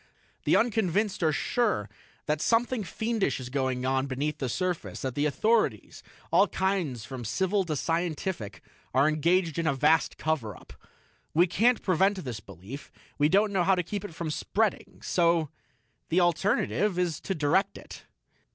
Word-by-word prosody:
The - - +4
unconvinced 210 -3 +1
are 160 -2 +3
sure 210 - 0 0.4
that 150 0 -1
something 235 0 +1
fiendish 220 0 -1
is 125 -1 -7
going 130 -1 -1
on 130 +1 +1
beneath 145 +3 -2
the 130 - -2
surface, 180 +5 -3
that 130 -2 -2
the 145 +3 +1
authorities 210 - 0 0.3
all 190 +5 +5
kinds 180 - -1
from 130 -1 -7
civil 190 - 0
to 155 -3 -2
scientific 165 - -2 0.3
are 135 +3 +5
engaged 165 +2 +1
in 165 - 0
a 140 - +2
vast 150 +4 +2
cover 135 - -2
up. - - -15 0.6
We 170 +3 +6
can't 225 +7 +2
prevent 195 +2 +2
this 120 -4 -4
belief; 100 - -10 0.3
we 145 +1 +4
don't 200 +3 +3
know 185 -2 +2
how 190 +2 +4
to 180 - -1
keep 200 +4 -4
it 200 -6 -8
from 160 -2 -3
spreading. 210 +6 -1
So 170 -3 +2 0.6
the 175 - +3
alternative 185 +2 +1
is 175 -4 0
to 195 - -3
direct 160 +6 +1
it." - - -12
170 Hz, 160 wpm, -28 LUFS, 140-195 Hz, 0.6 s, We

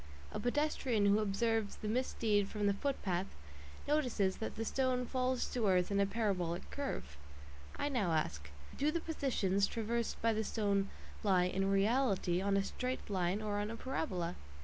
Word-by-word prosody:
A - - -3
pedestrian 245 -4 +1
who 200 +1 +5
observes 215 +1 0
the 215 - -6
misdeed 215 -3 +1
from 210 -1 -2
the 200 - +4
footpath 195 -7 -1 0.6
notices 250 -10 +1
that 220 - -4
the 225 - -3
stone 255 0 +1
falls 255 0 0
to 235 -4 0
earth 185 0 +3
in 200 - +2
a 200 - +4
parabolic 190 -5 -1
curve. 75 - -4 0.6
I - - -1
now 220 - +1
ask: 75 - -1 0.3
Do 290 +2 +1
the 335 - 0
"positions" 215 - +1
traversed 230 0 -2
by 230 0 +2
the 220 0 0
stone 200 -2 0 0.3
lie 190 -4 +4
"in 195 +2 0
reality" 195 -3 +2
on 200 0 +2
a 195 - +2
straight 250 +2 -4
line 185 +2 0
or 205 -1 -1
on 205 +1 -2
a 230 - -4
parabola? 185 - -2
210 Hz, 170 wpm, -35 LUFS, 195-250 Hz, 0.6 s, who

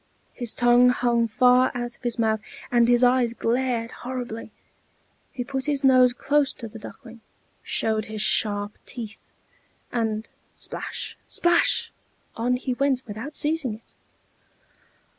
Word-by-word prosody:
His 240 -3 -2
tongue 240 0 +5
hung 240 -2 +2
far 250 +3 +4
out 240 0 -4
of - - -26
his 240 -2 +1
mouth, 220 -2 +1 0.3
and 240 -1 +4
his 245 +1 +4
eyes 245 -1 +3
glared 235 -1 -1
horribly. 245 -3 -6 0.8
He 250 - -4
put 265 +2 -4
his 285 -1 0
nose 255 -2 +6
close 280 +2 +1
to 230 - -8
the 225 +1 -11
Duckling, 230 +1 -12 0.4
showed 220 -1 0
his 215 0 -6
sharp 205 -1 +1
teeth, 220 -3 -7 0.6
and 220 -2 -2 0.3
splash, - - -6
splash! 345 0 +2 0.4
on 245 +2 0
he 255 0 -2
went 265 0 0
without 230 +7 -7
seizing 300 -7 0
it. 225 - -20
245 Hz, 135 wpm, -24 LUFS, 225-255 Hz, 0.8 s, nose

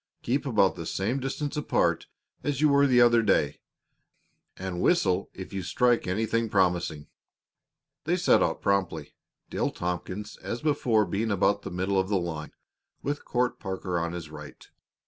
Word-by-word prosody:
Keep 135 +4 0
about 105 -6 +3
the 85 -2 -6
same 110 +8 -1
distance 135 +2 -3
apart 150 - +1 0.4
as 145 -2 -1
you 155 0 +4
were 140 0 +5
the 125 -2 +4
other 120 -1 +6
day, 105 -3 +1 1.0
and 95 -2 -4
whistle 95 - +2
if 95 +1 -8
you 95 - -2
strike 120 +7 +2
anything 110 +4 0
promising." 90 -6 +1 1.0
They - - +1
set - - +4
off - - 0
promptly, 90 -7 -1 0.4
Dale - - 0
Tompkins 90 +4 -4
as 120 - -5
before 120 -8 +2
being 110 +4 -1
about 100 0 +2
the - - -6
middle 95 +2 0
of 95 0 -1
the 100 - +2
line, 80 -4 -4 0.5
with 145 +1 -3
Court 125 0 0
Parker 95 -3 -3
on 85 +1 -2
his 85 -3 -7
right. - - -11
100 Hz, 160 wpm, -27 LUFS, 90-120 Hz, 1.0 s, other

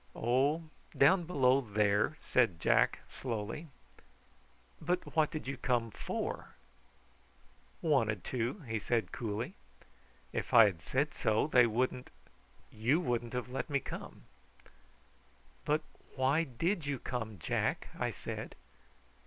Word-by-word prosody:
"Oh, 135 +7 +2 0.3
down 170 +6 +5
below 135 -5 +3
there," 105 +4 +1
said 115 -10 +2
Jack - - +3
slowly. 115 +6 -4 1.1
"But 175 +2 -2
what 155 -2 +4
did 155 - -5
you 135 +1 -4
come 120 -3 0
for?" - - -4 1.3
"Wanted 115 - +2
to," 125 - -2
he 110 -6 -3
said 110 -3 0
coolly. 110 0 -3 0.8
"If - - -2
I 115 -2 +10
had 90 -6 -1
said 140 - 0
so, 110 +3 +1
they 125 -5 +5
wouldn't 125 +2 -1 0.6
you 120 +9 +2
wouldn't 120 -7 -1
have 125 0 -3
let 130 +5 -3
me 140 -1 +2
come." - - -8 1.4
"But 150 +1 +1 0.3
why 140 +5 +2
did 165 - -1
you 140 -1 -1
come, 115 -4 -4
Jack?" 80 - -1
I - - +1
said. - - -6
125 Hz, 120 wpm, -33 LUFS, 110-145 Hz, 1.4 s, I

